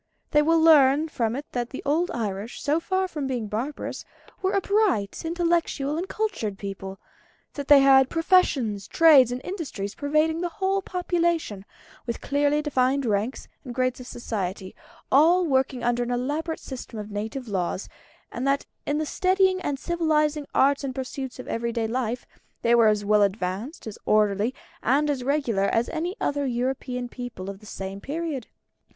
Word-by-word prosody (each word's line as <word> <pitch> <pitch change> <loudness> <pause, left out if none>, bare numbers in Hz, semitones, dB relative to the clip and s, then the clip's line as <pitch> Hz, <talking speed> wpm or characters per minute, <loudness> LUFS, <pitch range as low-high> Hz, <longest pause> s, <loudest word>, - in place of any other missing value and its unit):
They 295 - +5
will 330 +2 +3
learn 305 -1 +5
from 230 -5 -1
it 285 +2 -5
that 245 -1 -2
the 265 - -7
old 320 +5 +1
Irish, 210 -1 -4
so 295 +3 +1
far 375 +2 0
from 300 -6 -4
being 245 -4 -2
barbarous, 230 +8 -4 0.4
were 380 +1 0
a 395 - +3
bright, 400 - +1
intellectual, 335 -4 0
and 350 +4 -3
cultured 380 - -2
people; 195 -1 -6 0.6
that 285 -1 -6
they 290 -2 +8
had 265 -1 +6
professions, 290 - +2
trades, 290 -7 +6
and 250 +1 -3
industries 280 - -5
pervading 305 +3 +1
the 350 - -1
whole 385 +3 0
population, 340 - -1 0.4
with 235 - -3
clearly 290 +1 +1
defined 270 -1 +1
ranks 215 +3 -1 0.2
and 245 -4 -8
grades 255 0 0
of 250 - -9
society, 195 -6 -4 0.4
all 340 +6 +5
working 265 -4 0
under 240 0 +1
an 240 - -2
elaborate 290 +7 -2
system 250 -3 -8
of 210 0 -6
native 220 +5 -4
laws; 185 -2 -2 0.4
and 250 +3 -3
that 275 0 +1 0.2
in 290 - +1
the 310 - -1
steadying 370 +3 +2
and 285 -5 -2
civilising 305 -2 0
arts 280 +1 +3
and 260 -2 -4
pursuits 265 0 -5
of 255 - -9
everyday 230 0 -2
life 240 +1 -2 0.4
they 235 - +4
were 230 -2 +6
as 210 -1 +2
well 210 0 +4
advanced, 200 - -2
as 220 -2 -7
orderly, 210 +1 +3 0.3
and 290 +5 +2
as 265 -3 -3
regular 250 -8 +1
as 230 +3 +1
any 340 +4 -3
other 285 -1 -1
European 250 0 -2
people 240 -6 -7
of 195 - -12
the 215 - -15
same 195 0 -6
period. 295 -3 -4
265 Hz, 170 wpm, -25 LUFS, 225-315 Hz, 0.6 s, they